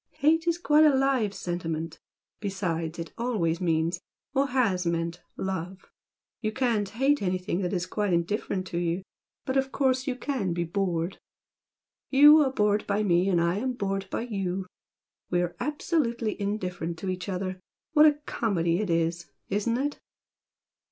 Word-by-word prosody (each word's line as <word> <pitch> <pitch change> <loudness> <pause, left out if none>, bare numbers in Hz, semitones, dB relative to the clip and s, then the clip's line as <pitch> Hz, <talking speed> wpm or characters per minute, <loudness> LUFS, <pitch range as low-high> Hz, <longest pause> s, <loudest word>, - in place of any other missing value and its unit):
Hate 320 +3 +2
is 340 0 +2
quite 310 -3 +4
a 305 - +8
live 265 -6 +2
sentiment, 165 -4 -4 0.4
besides 175 -5 -2
it 165 -1 -6
always 190 -9 0
means, 165 +1 0 0.3
or 275 0 +2
HAS 220 -9 +1
meant 170 0 -1 0.2
love! 190 0 -4 0.5
You 215 -2 -1
can't 225 -5 0
hate 270 +5 +2
anything 185 0 -1
that 180 -2 -1
is 180 -2 -1
quite 205 +1 -1
indifferent 185 +2 -1
to 170 - -2
you, 175 +2 -1 0.4
but 260 +1 0
of 265 0 +1
course 260 -1 +1
you 260 - 0
CAN 250 -8 -2
be 170 0 -1
bored! 175 0 -1 0.9
YOU 295 +3 +8
are 275 -3 +3
bored 210 -3 +1
by 205 +1 +1
me 180 -1 +3
and 175 -3 +3
I 170 +2 +1
am 255 +4 -1
bored 195 -4 -2
by - - -2
YOU! 195 -6 -2
and 190 0 -4 0.6
we 175 0 +2
are 175 0 -4
absolutely 245 -5 -1
indifferent 180 -5 -3
to 190 - -4
each 185 +2 -4
other! 185 0 -3 0.3
What 305 0 +8
a 300 - +6
comedy 175 -6 0
it 210 -3 -2
is! 170 +1 0 0.2
Isn't 210 +4 0
it?" 285 +2 -2
195 Hz, 165 wpm, -27 LUFS, 175-250 Hz, 0.9 s, a